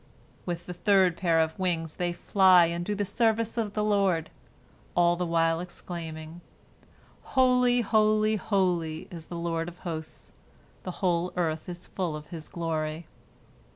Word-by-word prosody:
With 175 -1 -3
the 180 - -6
third 190 -2 +3
pair 170 -2 +2
of 160 +2 0
wings 165 -4 -1
they 175 -1 0
fly 185 0 +5
and 170 +1 -2
do 205 +3 -2
the 205 0 -1
service 225 +2 +1
of 220 -3 -2
the 210 - +1
Lord, 195 -6 +1 0.6
all 175 0 +4
the 180 0 -2
while 165 0 +2
exclaiming, 165 -2 -7 1.0
"Holy, 250 -1 +4
holy, 215 0 +3
holy 180 -6 0
is 165 -3 -9
the 175 - -6
Lord 165 -1 -2
of 175 - -15
hosts; 160 -2 -6 0.5
the - - -6 0.2
whole 175 0 +1
earth 160 -1 -1
is 175 0 -7
full 175 -5 -3
of 150 0 -9
His 160 -3 -8
glory." 160 -1 -3
175 Hz, 155 wpm, -28 LUFS, 165-200 Hz, 1.0 s, fly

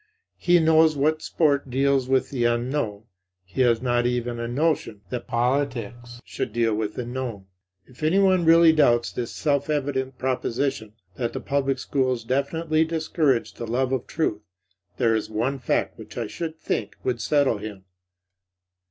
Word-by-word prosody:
He 175 0 +4
knows 160 -1 +4
that 155 +3 +1
sport 140 -4 +1
deals 135 0 +1
with 130 -1 +1
the 125 -4 -1
unknown; 120 -3 -1 0.4
he 95 +8 -3
has 120 -1 +3
not 120 -1 +2
even 120 -1 -2
a 115 - -3
notion 140 -5 -1
that 125 -2 -4
politics 120 -2 -2
should - - -4
deal 115 0 +1
with 105 0 -2
the 125 - -4
known. 120 -5 -5 0.4
If 125 - -19
anyone 185 +3 +3
really 165 0 +7
doubts 120 -6 +3
this 120 -2 -4
self 145 -1 0
evident 135 -3 -1
proposition, 130 -2 -2 0.2
that 120 -2 -2
the 130 - -3
public 135 +1 0
schools 130 -3 -1
definitely 155 +6 0
discourage 160 -5 0
the 115 - -7
love 125 +3 0
of 130 -3 -2
truth, 110 -10 -1 0.6
there 115 -3 +3
is 110 -1 -1
one 120 +6 -1
fact 125 - -1
which - - -11
I - - -1
should 160 -2 -5
think - - -3
would 120 -3 -1
settle 135 -1 +2
him. 100 -2 -8
130 Hz, 160 wpm, -24 LUFS, 120-145 Hz, 0.6 s, really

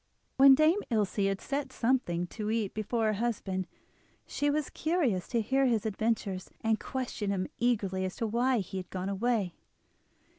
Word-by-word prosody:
When 270 0 +9
Dame 310 +7 +4
Ilse 205 -3 +1
had 195 -1 -1
set 280 -1 -3
something 230 -10 0
to 215 -2 -4
eat 220 -3 -1
before 220 +2 -1
her 215 - +2
husband, 195 -5 -2 0.6
she 290 - -1
was 300 0 -1
curious 300 - 0
to 235 -2 0
hear 265 +5 +2
his 225 -4 +1
adventures, 210 -3 -1
and 220 -1 +1
questioned 245 -6 -3
him 185 -2 -1
eagerly 200 -6 +1
as 185 0 -3
to 230 - -2
why 240 +2 +2
he 190 +1 -6
had 185 -1 -6
gone 185 +1 -3
away. 200 -2 0
220 Hz, 170 wpm, -30 LUFS, 195-255 Hz, 0.6 s, When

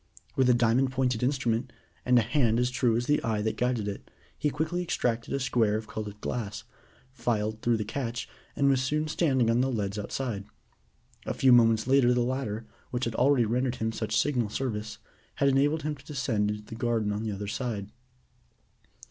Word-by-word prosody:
With 130 -1 +3
a 125 - +6
diamond 120 +3 +3
pointed 130 -3 0
instrument, 125 -3 0 0.4
and 125 0 +5
a 120 - +5
hand 115 -2 +2
as 125 +1 +1
true 120 -2 +2
as 120 - -1
the 150 +3 +1
eye 110 -2 0
that 110 - -1
guided 125 -4 0
it, 100 - -6 0.3
he 150 - 0
quickly 160 +5 -2
extracted 120 -9 -1
a 140 - 0
square 115 -5 +2
of 110 - -6
colored 105 -2 -6
glass, 110 -3 -4 0.5
filed 110 -3 -1
through 120 -1 +2
the 105 - -3
catch, 120 +1 -3 0.3
and 140 - +2
was 135 -2 +3
soon 150 +4 0
standing 135 -6 +2
on 120 +2 +3
the 135 - +1
leads 105 -3 -2
outside. 105 -1 -3 0.8
A - - -2
few 130 - +4
moments 115 -2 +5
later, 130 -1 +4
the 125 - +2
ladder, 120 -3 -2 0.2
which 125 0 -2
had 115 - -2
already 125 0 +3
rendered 125 +3 0
him 110 -1 -1
such 110 -1 -2
signal 125 -7 +1
service, 110 -3 -3 0.4
had 140 - +3
enabled 145 +3 +2
him 150 0 -1
to 140 - -17
descend 130 -8 -1
into 105 0 -4
the 110 - -11
garden 115 -2 0
on 105 +1 -2
the 110 -1 -2
other 100 0 -5
side. 105 -3 -3
120 Hz, 195 wpm, -28 LUFS, 110-130 Hz, 0.8 s, a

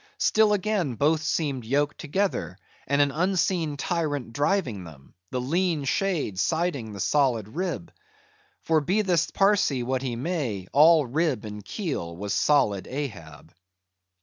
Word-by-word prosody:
Still 215 -1 +3
again 195 - 0
both 155 +5 +2
seemed 145 -5 -1
yoked 145 +5 0
together, 160 - -2 0.3
and 140 +1 +4
an 140 - 0
unseen 170 -2 0
tyrant 145 -7 -2
driving 145 - 0
them; 75 -5 -14 0.2
the 125 - -2
lean 165 +4 0
shade 150 - -1
siding 160 - -1
the 100 - -8
solid 120 -2 +1
rib. 160 - -4 0.7
For 160 -1 +2
be 190 +9 +1
this 175 -4 +1
Parsee 195 -10 +2
what 130 +1 -1
he 130 -3 -3
may, 125 - -3
all 155 +1 +6
rib 140 -3 -1
and 105 -1 -7
keel 100 - -4
was 100 +1 -3
solid 105 -10 +2
Ahab. 100 - -7
145 Hz, 140 wpm, -26 LUFS, 115-170 Hz, 0.7 s, all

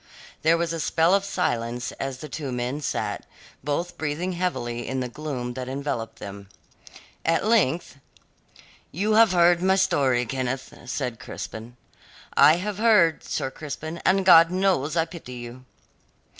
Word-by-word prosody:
There 165 +2 +4
was 170 -1 -1
a 165 - -3
spell 165 +3 +2
of 200 0 +3
silence 120 -11 -2
as 135 -1 -3
the 150 - -8
two 145 -2 -5
men 125 +4 -3
sat, 140 - -3 0.4
both 170 +5 -3
breathing 155 +4 -2
heavily 120 -10 -3
in 130 0 -2
the 125 - -2
gloom 125 -2 -5
that 130 0 -5
enveloped 135 -4 -4
them. 100 -1 -9 0.7
At 165 +4 +1
length: 175 - +1 0.9
"You 205 +7 0
have 220 -2 +6
heard 175 0 +4
my 190 +1 +3
story, 140 -10 +2
Kenneth," 130 +1 -3
said 125 -3 -3
Crispin. 115 +2 -8 0.6
"I 150 +3 +7
have 200 +3 -4
heard, 210 -8 +4
Sir 130 - -3
Crispin, 155 +3 -7
and 190 0 +3
God 165 -2 +8
knows 180 -5 +1
I 165 - +3
pity 165 -7 -10
you." 120 +1 -9
150 Hz, 150 wpm, -25 LUFS, 125-175 Hz, 0.9 s, God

